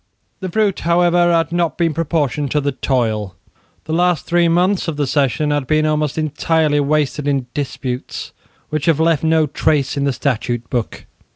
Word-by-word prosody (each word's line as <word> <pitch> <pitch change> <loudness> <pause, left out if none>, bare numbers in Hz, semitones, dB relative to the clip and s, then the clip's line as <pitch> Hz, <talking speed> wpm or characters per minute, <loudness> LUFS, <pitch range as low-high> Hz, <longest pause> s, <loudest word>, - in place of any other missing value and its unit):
The 185 - -4
fruit 210 -1 +1
however 175 0 +3
had 165 -1 +1
not 170 -1 0
been 165 -2 +1
proportioned 150 -3 -1
to 150 - +2
the 140 0 -1
toil. 110 -7 -1 0.5
The 160 - -4
last 175 -2 +1
three 175 0 +2
months 180 +4 +1
of 160 -3 -3
the 145 - +1
session 145 +2 0
had 145 -3 -1
been 155 +1 +2
almost 150 -1 0
entirely 155 0 +1
wasted 145 0 0
in 140 -3 0
disputes, 130 -3 -4 0.4
which 155 -1 -1
have 160 -2 +3
left 165 -2 +2
no 160 -1 +3
trace 145 -1 0
in 140 - 0
the 140 - +2
Statute 120 -2 -2
Book. 120 -4 -3
150 Hz, 175 wpm, -18 LUFS, 140-165 Hz, 0.5 s, however